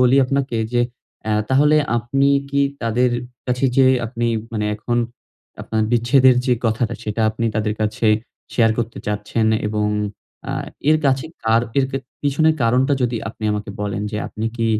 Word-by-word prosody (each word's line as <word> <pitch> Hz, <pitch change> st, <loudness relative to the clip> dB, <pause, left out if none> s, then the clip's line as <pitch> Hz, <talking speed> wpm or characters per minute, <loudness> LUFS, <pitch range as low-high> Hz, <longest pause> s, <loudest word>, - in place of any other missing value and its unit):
বলি 125 Hz, +1 st, +5 dB
আপনাকে 135 Hz, -2 st, -1 dB, 0.2 s
যে 120 Hz, -, +3 dB, 0.4 s
অ্যা 110 Hz, -, 0 dB
তাহলে 145 Hz, +3 st, +4 dB, 0.2 s
আপনি 135 Hz, +5 st, +1 dB, 0.2 s
কি 140 Hz, 0 st, +1 dB, 0.2 s
তাদের 120 Hz, +2 st, +2 dB, 0.4 s
কাছে 125 Hz, +1 st, 0 dB
যে 135 Hz, -1 st, +6 dB, 0.2 s
আপনি 120 Hz, 0 st, -2 dB, 0.3 s
মানে 105 Hz, -2 st, -1 dB
এখন 120 Hz, +3 st, -2 dB, 0.7 s
আপনার 110 Hz, -1 st, -1 dB
বিচ্ছেদের 125 Hz, +2 st, +5 dB
যে 125 Hz, -, +4 dB
কথাটা 110 Hz, +1 st, 0 dB
সেটা 105 Hz, +1 st, -2 dB
আপনি 115 Hz, +1 st, -4 dB
তাদের 105 Hz, 0 st, 0 dB
কাছে 110 Hz, +1 st, 0 dB, 0.5 s
শেয়ার 115 Hz, -2 st, +4 dB
করতে 115 Hz, -1 st, -3 dB
চাচ্ছেন 105 Hz, +2 st, -1 dB, 0.2 s
এবং 105 Hz, 0 st, 0 dB, 0.6 s
আ -, -, -2 dB, 0.4 s
এর 155 Hz, -, +6 dB
কাছে 130 Hz, +2 st, +2 dB, 0.2 s
কার 115 Hz, +1 st, +3 dB, 0.2 s
এরকে 135 Hz, 0 st, 0 dB, 0.3 s
পিছনের 155 Hz, +3 st, +3 dB
কারণটা 125 Hz, +4 st, +3 dB
যদি 120 Hz, -1 st, 0 dB
আপনি 110 Hz, -1 st, -8 dB
আমাকে 105 Hz, 0 st, -4 dB
বলেন। 105 Hz, 0 st, -2 dB
যে -, -, -2 dB
আপনি 110 Hz, +1 st, -4 dB
কি 115 Hz, -, 0 dB
120 Hz, 160 wpm, -20 LUFS, 110-130 Hz, 0.7 s, যে